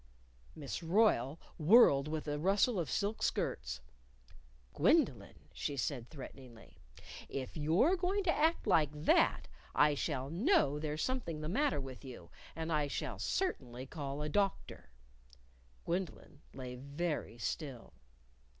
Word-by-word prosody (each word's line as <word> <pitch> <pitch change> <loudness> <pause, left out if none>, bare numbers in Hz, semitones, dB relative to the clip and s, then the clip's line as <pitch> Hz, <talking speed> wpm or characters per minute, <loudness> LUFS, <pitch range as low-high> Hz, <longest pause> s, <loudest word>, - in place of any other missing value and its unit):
Miss 145 -4 -5
Royle 165 - +2 0.2
whirled 155 - +6
with 155 0 -4
a 145 0 -2
rustle 195 +5 +2
of 160 -6 -2
silk 205 +2 -1
skirts. 65 +1 -1 0.9
"Gwendolyn," - - +2 0.2
she 140 - -3
said 125 -3 -2
threateningly, 130 -5 -12 0.5
"if 130 -2 -5
you're 170 - +3
going 380 +3 0
to 335 -3 +2
act 320 +3 +2
like 165 -8 +4
that, 150 0 +2 0.3
I 150 0 +5
shall 140 -2 -2
know 170 - +2
there's 155 0 -2
something 205 -12 -2
the 155 - -3
matter 280 - +1
with 130 -1 -8
you, 120 - -10 0.2
and 165 +1 -3
I 150 -1 +1
shall 140 - -4
certainly 130 - -2
call 140 +1 -5
a - - -2
doctor." 195 - -1 1.0
Gwendolyn 170 -4 -4
lay 130 -2 -7
very 140 -1 -4
still. 130 +1 -5
150 Hz, 130 wpm, -34 LUFS, 135-190 Hz, 1.0 s, whirled